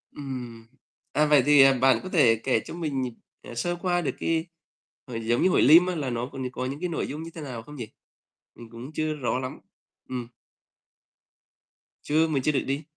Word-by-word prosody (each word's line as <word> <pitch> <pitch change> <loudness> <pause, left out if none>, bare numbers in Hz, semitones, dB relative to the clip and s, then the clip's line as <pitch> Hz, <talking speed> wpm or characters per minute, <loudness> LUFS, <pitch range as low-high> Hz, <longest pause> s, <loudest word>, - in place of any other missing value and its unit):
Ừm. 125 -5 -7 0.5
À, 150 - +3
vậy 145 -4 +5
thì, 145 -1 +7
à, 135 0 +7
bạn 130 +1 +3
có 185 - -6
thể 125 -11 +5
kể 130 -4 +2
cho - - -8
mình, 140 -7 -2 0.3
à, 120 - -10
sơ 175 +8 -1
qua 175 0 0
được - - -2
cái 165 0 0 0.6
hội 115 -2 -5
giống 120 +1 +2
như 185 - +5
hội - - +3
Lim 165 +6 +8
á, 180 - -1
là 140 -5 -2
nó 120 +1 -3
có 135 - -7
có 130 - -3
những 140 +3 -4
cái 180 -1 -2
nội 165 - -2
dung 150 +3 -6
như 165 - -8
thế 160 - -7
nào 125 -6 -6
không 150 +3 -12
nhỉ? 120 -5 -6 0.7
Mình 115 -1 -12
cũng 120 +6 -9
chưa 155 0 -1
rõ 130 -3 -1
lắm. 130 0 -6 0.5
Ừm. 125 -2 -4 1.7
Chưa, 160 +2 +2
mình 140 -4 -1
chưa 150 - +3
được 135 - 0
đi. 140 +3 -2
140 Hz, 215 wpm, -26 LUFS, 125-155 Hz, 1.7 s, Lim